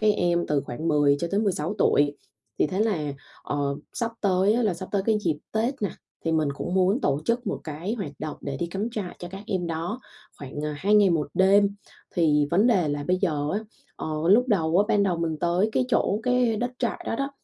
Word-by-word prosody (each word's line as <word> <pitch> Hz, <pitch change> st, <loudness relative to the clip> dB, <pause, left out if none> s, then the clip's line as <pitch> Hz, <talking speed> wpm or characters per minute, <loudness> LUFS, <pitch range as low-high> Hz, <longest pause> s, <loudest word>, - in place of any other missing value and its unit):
cái 215 Hz, 0 st, +4 dB
em 175 Hz, -3 st, +1 dB
từ 150 Hz, -1 st, +1 dB
khoảng 160 Hz, +7 st, -4 dB
10 145 Hz, -1 st, +4 dB
cho 170 Hz, -, -1 dB
tới 200 Hz, -, +1 dB
16 195 Hz, -3 st, -1 dB
tuổi. 145 Hz, 0 st, +3 dB, 0.4 s
Thì -, -, +3 dB
thế 185 Hz, +6 st, -2 dB
là, 170 Hz, -10 st, 0 dB, 0.3 s
ờ, 140 Hz, -1 st, -1 dB, 0.2 s
sắp 230 Hz, -1 st, -2 dB
tới 195 Hz, 0 st, +3 dB
á, 240 Hz, +2 st, +1 dB
là 210 Hz, -5 st, +1 dB
sắp 185 Hz, +2 st, -7 dB
tới 200 Hz, -2 st, +1 dB
cái 220 Hz, -2 st, +3 dB
dịp 165 Hz, -7 st, 0 dB
Tết 235 Hz, +4 st, -1 dB
nè, 200 Hz, -, 0 dB, 0.3 s
thì 165 Hz, -, +1 dB
mình 155 Hz, -2 st, +2 dB
cũng 175 Hz, +5 st, -4 dB
muốn 190 Hz, +6 st, +3 dB
tổ 145 Hz, -, +1 dB
chức 235 Hz, +4 st, 0 dB
một -, -, -2 dB
cái 165 Hz, +7 st, -4 dB
hoạt 190 Hz, -11 st, -5 dB
động 155 Hz, -, -5 dB
để 140 Hz, -1 st, -4 dB
đi 170 Hz, -, -2 dB
cắm 195 Hz, +6 st, -3 dB
trại 210 Hz, -6 st, -5 dB
cho 175 Hz, -, -7 dB
các 195 Hz, +2 st, -8 dB
em 185 Hz, -4 st, -1 dB
đó 170 Hz, +8 st, -3 dB, 0.4 s
khoảng, 145 Hz, +2 st, -6 dB
à, 150 Hz, -1 st, -2 dB
2 205 Hz, +5 st, +2 dB
ngày 205 Hz, -3 st, +6 dB
1 155 Hz, -4 st, 0 dB
đêm. 200 Hz, +1 st, +4 dB, 0.4 s
Thì 150 Hz, -4 st, +3 dB
vấn 200 Hz, +7 st, +4 dB
đề 190 Hz, -10 st, +3 dB
là 145 Hz, 0 st, -2 dB
bây 180 Hz, +4 st, +2 dB
giờ 155 Hz, -6 st, 0 dB
á, 205 Hz, -, 0 dB, 0.4 s
ờ, -, -, -5 dB, 0.2 s
lúc 240 Hz, +7 st, +5 dB
đầu 170 Hz, -5 st, +2 dB
á 205 Hz, -, +5 dB
ban 205 Hz, -3 st, +3 dB
đầu 185 Hz, -3 st, +1 dB
mình 165 Hz, -2 st, -1 dB
tới 175 Hz, +5 st, +2 dB
cái 255 Hz, -, +2 dB
chỗ 210 Hz, -4 st, +1 dB
cái 250 Hz, -2 st, +2 dB
đất 245 Hz, +3 st, -1 dB
trại 240 Hz, -, -2 dB
đó -, -, -1 dB
đó, 275 Hz, +2 st, -2 dB
185 Hz, 235 wpm, -25 LUFS, 155-210 Hz, 0.4 s, ngày